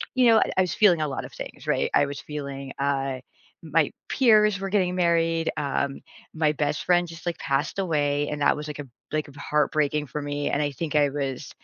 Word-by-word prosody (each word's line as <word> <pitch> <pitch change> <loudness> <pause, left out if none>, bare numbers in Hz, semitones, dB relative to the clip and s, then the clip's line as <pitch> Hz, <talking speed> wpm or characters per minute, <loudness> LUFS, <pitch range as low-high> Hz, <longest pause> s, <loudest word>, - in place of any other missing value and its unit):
you 250 -2 +5
know, 225 -1 +6 0.2
I - - +6
was 180 -4 0
feeling 180 -7 +5
a 155 - 0
lot 135 - -4
of - - -11
things, - - -9
right? - - +1
I 145 - +4
was 140 0 -6
feeling, 140 -2 -6
I 135 -2 -1 0.4
my 155 -1 +2 0.2
peers 215 -6 +4
were 195 - -3
getting 185 -3 +1
married, 165 -2 +2
um, 140 -1 -2 0.3
my 155 -2 +2
best 145 0 -1
friend 175 -1 +3
just, 165 +1 -11
like, 170 -1 -2
passed 140 +7 -1
away, 145 -5 0
and 150 -1 -4
that 145 - +3
was, 150 0 -6
like, 150 0 -7
a - - -3 0.3
b 155 -1 -1
heartbreaking 150 0 0
for 150 - -5
me. 145 0 -2
And 150 - 0
I 145 -1 0
think 150 +1 -4
I 145 -1 +5
was, 135 -1 -4
150 Hz, 210 wpm, -25 LUFS, 145-170 Hz, 0.4 s, know